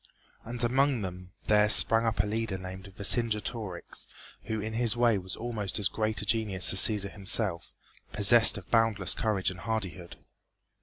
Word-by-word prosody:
And 120 +1 -2
among 130 -1 0
them 90 -1 -9
there 105 0 +2
sprang 115 +1 +4
up 115 - 0
a - - -5
leader 110 -2 -4
named 95 +1 -10
Vercingetorix, 105 -3 -1 0.4
who 110 0 -4
in 110 +2 -6
his 115 0 -1
way 120 -4 +2
was 95 0 -8
almost 110 -5 -4
as 100 -3 0
great 110 -3 -3
a - - -6
genius 105 -5 +1
as 95 - +2
Cæsar 100 -2 +3
himself, 100 -3 -1 0.4
possessed 110 +2 +6
of 95 - -13
boundless 115 -5 +1
courage 100 -4 -2
and 90 - -12
hardihood. 95 -4 -6
105 Hz, 160 wpm, -27 LUFS, 95-115 Hz, 0.4 s, possessed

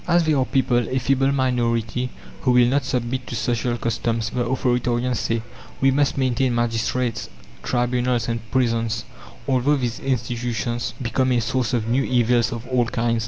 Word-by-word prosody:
"As 175 -1 +4
there 155 -1 +2
are 130 - +2
people, 120 -3 +1
a 130 - -1
feeble 135 +1 +2
minority, 125 -2 0 0.3
who 125 - +2
will 125 -1 +6
not 135 +2 +1
submit 125 0 -2
to - - -4
social 120 +1 -1
customs," 115 -1 -1
the 125 - 0
authoritarians 125 -1 0
say, 115 +1 -1 0.4
"we 135 0 +4
must 140 +1 +1
maintain 130 -1 +1
magistrates, 120 +1 -1 0.3
tribunals 125 - 0
and 115 0 -1
prisons, 115 -3 0 0.4
although 135 +2 +3
these 125 -4 -2
institutions 120 -2 -2
become 130 +1 0
a 120 - +3
source 125 0 0
of 115 -2 -1
new 125 +4 +2
evils 120 -2 +2
of 115 0 -5
all 125 -2 +2
kinds." 115 0 0
120 Hz, 165 wpm, -22 LUFS, 115-130 Hz, 0.4 s, will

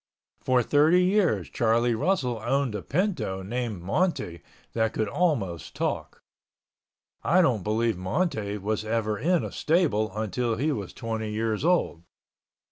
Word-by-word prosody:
For 125 -1 +3
thirty 155 +8 +4
years, 180 - +2
Charlie 115 +1 +2
Russell 125 - 0
owned 135 -2 0
a 105 - -3
pinto 155 - -1
named 110 -3 -3
Monte 95 - -1 0.3
that 110 -1 0
could 110 - -1
almost 105 - -1
talk. - - -3 1.0
I 180 - +3
don't 120 - +2
believe 110 0 0
Monte 105 - -1
was 105 +2 -2
ever 110 -1 -1
in 170 +6 +2
a - - -5
stable 145 - +1
until 115 +2 -1
he 145 +7 0
was 100 -9 -4
twenty 110 -2 -4
years 110 +2 -1
old. 170 - +1
115 Hz, 135 wpm, -26 LUFS, 105-150 Hz, 1.0 s, thirty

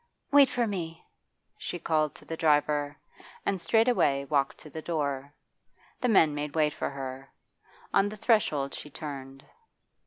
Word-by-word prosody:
'Wait 280 -2 +7
for 245 -2 0
me!' 170 -6 -5 0.5
she - - -4
called 155 -3 0
to - - -14
the 165 - -4
driver, 150 -2 +2 0.5
and 195 -3 0
straightway 170 - +3
walked 140 -1 0
to - - -13
the 160 +2 -7
door. 140 -4 -2 0.7
The 250 - +1
men 165 -8 +5
made 145 +1 -4
way 155 -1 +3
for - - -3
her. 135 -1 -7 0.6
On 200 - +4
the 215 - -8
threshold 200 - +2
she 150 - -7
turned. 135 -2 -8
150 Hz, 150 wpm, -28 LUFS, 140-185 Hz, 0.7 s, Wait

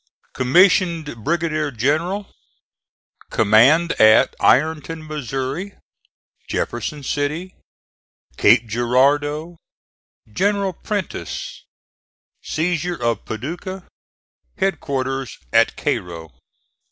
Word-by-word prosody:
COMMISSIONED 165 - +2
BRIGADIER 155 -1 0
GENERAL 155 - -1 1.0
COMMAND 125 +11 +4
AT 110 0 +6
IRONTON, 160 +3 +1
MO. 145 - -4 0.7
JEFFERSON 145 +4 -3
CITY 150 +7 -2 0.8
CAPE 115 +3 +4
GIRARDEAU 145 +8 +1 0.8
GENERAL 200 - 0
PRENTISS 205 +3 -5 0.8
SEIZURE 175 +1 -1
OF 115 -3 -1
PADUCAH 170 - -6 0.7
HEADQUARTERS 135 -8 -2 0.2
AT - - +4
CAIRO. 85 -3 -3
150 Hz, 65 wpm, -20 LUFS, 125-175 Hz, 1.0 s, AT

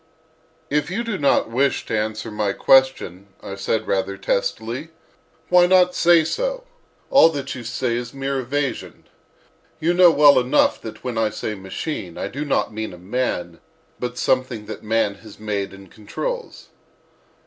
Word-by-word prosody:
"If 150 +1 +1
you 215 +6 -2
do 230 -4 -3
not 140 -5 +2
wish 135 +4 +1
to - - -2
answer 110 +1 -3
my 105 -2 -1
question," 130 -9 +2 0.2
I - - -6
said, 105 +3 -2
rather 100 0 -1
testily, 110 +10 -2 0.6
"why 180 0 +6
not 180 -1 +4
say 170 -2 +5
so?—all - - 0
that 140 -4 -4
you 130 - -7
say 120 +1 -2
is 120 -1 -5
mere 135 0 -3
evasion. 135 +2 -3 0.8
You 170 +3 +1
know 180 0 +7
well 145 -3 +6
enough 130 +4 +2
that 110 -1 -9
when 120 -3 -3
I 110 -1 +2
say 110 0 -4
'machine' 95 - -6
I - - -3
do 145 +3 -4
not 140 -6 0
mean 110 -2 -5
a - - -10
man, 90 -4 -3 0.4
but 125 0 -4
something 130 -4 0
that - - -8
man 110 -1 +1
has 110 -2 -14
made 105 -2 -3
and 95 -1 -14
controls." 485 - -6
125 Hz, 160 wpm, -22 LUFS, 105-150 Hz, 0.8 s, know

